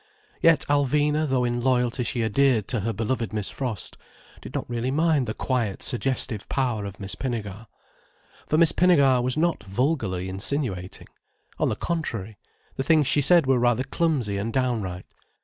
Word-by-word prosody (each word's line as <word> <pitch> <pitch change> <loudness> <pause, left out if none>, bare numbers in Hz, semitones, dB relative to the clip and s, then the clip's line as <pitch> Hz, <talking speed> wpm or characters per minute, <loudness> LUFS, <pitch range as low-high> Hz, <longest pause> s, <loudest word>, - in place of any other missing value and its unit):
Yet 165 -4 +4
Alvina, 145 +2 +2
though 130 -1 +1
in 120 0 -1
loyalty 125 0 +1
she 120 0 -1
adhered 110 -1 +2
to 125 - 0
her 110 +3 -1
beloved 115 +2 -2
Miss 105 -3 -2
Frost, 120 -8 -5 0.4
did - - -9
not - - -3
really 120 +1 -2
mind 155 -2 +2
the 110 - -3
quiet 120 -7 -2
suggestive 120 -4 -2
power 120 -6 -1
of 100 0 -8
Miss 100 -1 -5
Pinnegar. 115 -4 -5 0.8
For 155 - +1
Miss 165 -1 +5
Pinnegar 140 -8 +4
was 125 +3 -1
not 170 +2 +1
vulgarly 100 - -1
insinuating. 95 -1 -2 0.5
On - - +2
the - - -1
contrary, 115 - -4 0.4
the 135 - 0
things 155 +1 +4
she 145 - +2
said 170 +2 +4
were 130 -1 +3
rather 120 +1 +2
clumsy 135 - -1
and 110 +3 -3
downright. 110 -8 -2
125 Hz, 165 wpm, -25 LUFS, 110-140 Hz, 0.8 s, Miss